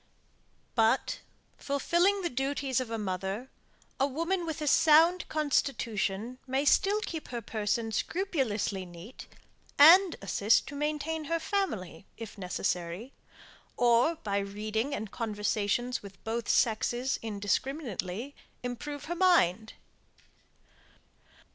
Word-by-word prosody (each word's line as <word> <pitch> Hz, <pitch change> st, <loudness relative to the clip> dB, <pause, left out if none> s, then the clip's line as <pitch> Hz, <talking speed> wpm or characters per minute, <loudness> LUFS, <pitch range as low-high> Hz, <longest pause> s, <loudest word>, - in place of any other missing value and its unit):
But, 225 Hz, +2 st, +2 dB, 0.4 s
fulfilling 345 Hz, +8 st, +1 dB
the 345 Hz, -, 0 dB
duties 270 Hz, 0 st, -1 dB
of 255 Hz, -3 st, -4 dB
a 225 Hz, -, -3 dB
mother, 195 Hz, +4 st, -4 dB, 0.5 s
a 275 Hz, -, +3 dB
woman 335 Hz, +5 st, -2 dB
with 320 Hz, 0 st, -3 dB
a 305 Hz, -, -3 dB
sound 325 Hz, +5 st, +5 dB
constitution, 250 Hz, -6 st, -1 dB
may 265 Hz, +2 st, 0 dB
still 405 Hz, +7 st, +3 dB
keep 330 Hz, -7 st, -5 dB
her 240 Hz, -, -4 dB
person 225 Hz, 0 st, -2 dB
scrupulously 230 Hz, -, -1 dB
neat, 175 Hz, +7 st, -11 dB, 0.5 s
and 345 Hz, +5 st, +8 dB
assist 205 Hz, +2 st, +2 dB
to 285 Hz, -, -8 dB
maintain 300 Hz, +2 st, -2 dB
her 330 Hz, +3 st, 0 dB
family, 215 Hz, -, -3 dB
if 225 Hz, -2 st, -8 dB
necessary, 180 Hz, +3 st, -3 dB, 0.6 s
or 245 Hz, +7 st, +4 dB
by 200 Hz, -8 st, -2 dB
reading 215 Hz, +6 st, -2 dB
and 210 Hz, -1 st, -6 dB
conversations 215 Hz, +2 st, -1 dB
with 200 Hz, -1 st, -13 dB
both 225 Hz, 0 st, -3 dB
sexes, 240 Hz, +3 st, +1 dB
indiscriminately, 220 Hz, -, -3 dB, 0.3 s
improve 285 Hz, +4 st, -5 dB
her 345 Hz, -, -3 dB
mind. 225 Hz, -, +3 dB
245 Hz, 110 wpm, -29 LUFS, 210-300 Hz, 0.6 s, and